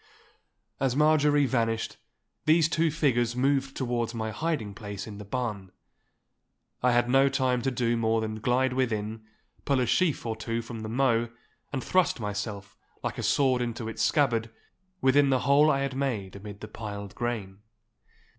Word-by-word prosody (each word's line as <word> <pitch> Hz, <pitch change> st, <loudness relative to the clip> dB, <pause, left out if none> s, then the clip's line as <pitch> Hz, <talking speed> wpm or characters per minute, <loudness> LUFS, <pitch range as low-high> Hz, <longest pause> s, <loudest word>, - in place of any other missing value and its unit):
As 130 Hz, -2 st, +1 dB
Marjorie 150 Hz, -1 st, +4 dB
vanished 115 Hz, -3 st, -1 dB, 0.5 s
these 160 Hz, 0 st, +5 dB
two 165 Hz, 0 st, +1 dB
figures 120 Hz, -6 st, +1 dB
moved 135 Hz, +1 st, +1 dB
towards 120 Hz, -2 st, -1 dB
my 110 Hz, -1 st, -3 dB
hiding 145 Hz, -7 st, -2 dB
place 100 Hz, -2 st, -7 dB
in 105 Hz, -2 st, -9 dB
the -, -, -6 dB
barn. 105 Hz, -4 st, -4 dB, 1.1 s
I 125 Hz, -, +3 dB
had 120 Hz, 0 st, +3 dB
no 135 Hz, +2 st, +4 dB
time 130 Hz, -3 st, +1 dB
to 135 Hz, -, 0 dB
do 120 Hz, -2 st, 0 dB
more 115 Hz, -1 st, +1 dB
than 110 Hz, 0 st, -3 dB
glide 125 Hz, +3 st, +1 dB
within, 110 Hz, -4 st, -2 dB, 0.4 s
pull 140 Hz, -2 st, +1 dB
a 125 Hz, -, +2 dB
sheaf 165 Hz, 0 st, +1 dB
or 115 Hz, -1 st, -2 dB
two 115 Hz, +1 st, -3 dB
from 115 Hz, 0 st, -7 dB
the 110 Hz, 0 st, -5 dB
mow, 120 Hz, -1 st, +2 dB, 0.4 s
and 130 Hz, -3 st, -3 dB
thrust 185 Hz, -7 st, +2 dB
myself, 105 Hz, -1 st, -5 dB, 0.3 s
like -, -, -3 dB
a -, -, -1 dB
sword 130 Hz, -3 st, +2 dB
into 115 Hz, -1 st, -3 dB
its 115 Hz, -, -4 dB
scabbard, 115 Hz, -6 st, +2 dB, 0.5 s
within 140 Hz, +1 st, +4 dB
the 130 Hz, -1 st, +2 dB
hole 145 Hz, +2 st, +5 dB
I 140 Hz, -2 st, +2 dB
had 140 Hz, -1 st, -2 dB
made 115 Hz, -9 st, -2 dB
amid 100 Hz, 0 st, -9 dB
the 110 Hz, -, -6 dB
piled 105 Hz, -2 st, -7 dB
grain. 105 Hz, -5 st, -4 dB
120 Hz, 165 wpm, -28 LUFS, 110-135 Hz, 1.1 s, these